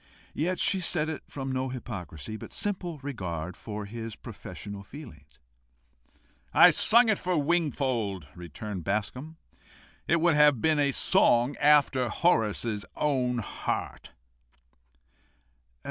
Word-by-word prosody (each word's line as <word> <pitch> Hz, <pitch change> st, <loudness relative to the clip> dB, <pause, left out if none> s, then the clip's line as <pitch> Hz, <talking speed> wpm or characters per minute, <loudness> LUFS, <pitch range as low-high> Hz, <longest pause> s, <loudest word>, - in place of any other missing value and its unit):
Yet 180 Hz, +5 st, -1 dB
she 190 Hz, -, +1 dB
said 160 Hz, -3 st, -1 dB
it 160 Hz, -, -5 dB
from 135 Hz, -1 st, -5 dB
no 130 Hz, 0 st, -1 dB
hypocrisy, 110 Hz, -, -7 dB
but 110 Hz, -, -9 dB
simple 180 Hz, -5 st, -2 dB
regard 90 Hz, -, -4 dB
to 105 Hz, -1 st, -5 dB
his 115 Hz, +1 st, -7 dB
professional 100 Hz, -1 st, -9 dB
feelings, 100 Hz, -, -13 dB, 1.2 s
"I -, -, +9 dB
sung 235 Hz, +2 st, +5 dB
it 215 Hz, -3 st, +2 dB
for 180 Hz, -1 st, -1 dB
Mr. 145 Hz, -, 0 dB
Wingfold," 130 Hz, -, 0 dB
returned 90 Hz, +3 st, -7 dB
Bascombe. 125 Hz, -, -3 dB, 0.7 s
"It 170 Hz, -, +3 dB
would 170 Hz, 0 st, +3 dB
have 150 Hz, -4 st, +5 dB
been 155 Hz, +4 st, +2 dB
a 140 Hz, -1 st, +3 dB
song 120 Hz, +1 st, +3 dB
after 145 Hz, -4 st, +4 dB
Horace's 110 Hz, -, +1 dB
own 130 Hz, -4 st, 0 dB
heart." 115 Hz, -, -4 dB
130 Hz, 120 wpm, -28 LUFS, 105-155 Hz, 1.2 s, I